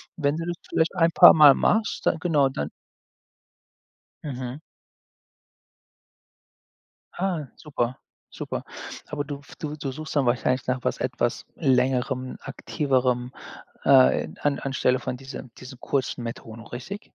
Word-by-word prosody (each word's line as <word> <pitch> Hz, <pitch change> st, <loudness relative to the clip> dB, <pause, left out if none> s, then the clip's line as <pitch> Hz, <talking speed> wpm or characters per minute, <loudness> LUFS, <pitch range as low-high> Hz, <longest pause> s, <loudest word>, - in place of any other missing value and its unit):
wenn 145 Hz, -2 st, 0 dB
du 165 Hz, +1 st, -4 dB
das 175 Hz, -, -2 dB
vielleicht 160 Hz, +3 st, 0 dB
ein 165 Hz, -1 st, +3 dB
paar -, -, +9 dB
Mal 150 Hz, -3 st, +9 dB
machst 215 Hz, +7 st, +1 dB
dann -, -, +3 dB
genau, 150 Hz, -5 st, +2 dB
dann 75 Hz, -, -4 dB, 1.6 s
Mhm. 130 Hz, -1 st, -5 dB, 2.5 s
Ah, 175 Hz, -6 st, -2 dB
super, 130 Hz, -5 st, -3 dB, 0.3 s
super. -, -, -5 dB, 0.4 s
Aber 145 Hz, -1 st, -3 dB
du 145 Hz, 0 st, -6 dB
f 140 Hz, -, -15 dB
du 150 Hz, -1 st, -5 dB
du 135 Hz, -2 st, -4 dB
suchst 155 Hz, +2 st, -7 dB
dann 135 Hz, -3 st, +3 dB
wahrscheinlich 125 Hz, +1 st, +1 dB
nach 130 Hz, 0 st, 0 dB
was -, -, 0 dB
etwas 120 Hz, -1 st, -2 dB
längerem, 130 Hz, -2 st, +1 dB
aktiverem, 125 Hz, -4 st, -1 dB, 0.5 s
äh, 135 Hz, -2 st, +5 dB
an 145 Hz, -1 st, +1 dB
anstelle 130 Hz, -1 st, +1 dB
von 125 Hz, -, -4 dB
diesem 130 Hz, -1 st, -9 dB
diese 130 Hz, 0 st, -10 dB
kurzen 130 Hz, -2 st, -2 dB
Methoden, 115 Hz, -1 st, -7 dB
richtig? 155 Hz, +12 st, -7 dB
135 Hz, 130 wpm, -25 LUFS, 125-150 Hz, 2.5 s, paar